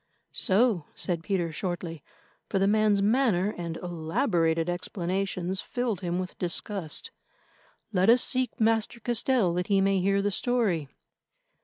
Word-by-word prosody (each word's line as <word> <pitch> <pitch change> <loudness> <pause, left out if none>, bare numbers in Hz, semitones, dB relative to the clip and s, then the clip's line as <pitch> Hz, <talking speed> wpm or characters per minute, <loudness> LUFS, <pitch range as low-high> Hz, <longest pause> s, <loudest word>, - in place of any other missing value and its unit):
"So!" 195 -4 +2
said 170 -3 -2
Peter 175 -2 -1
shortly, 170 -2 -4 0.5
for 200 - 0
the 195 - +3
man's 210 -1 +3
manner 210 -4 +2
and 170 -2 -5
elaborated 165 - 0
explanations 185 +1 -2
filled 245 -6 -2
him 175 -1 -2
with 185 0 -5
disgust. 190 - -2 0.8
"Let 185 +2 +3
us 245 +2 +6
seek 255 -2 -1
Master 225 +1 +1
Castell 235 -4 +1
that 180 +1 -2
he 200 -1 +3
may 195 0 +2
hear 195 +2 +1
the 205 - +1
story." 200 - 0
195 Hz, 135 wpm, -27 LUFS, 175-220 Hz, 0.8 s, us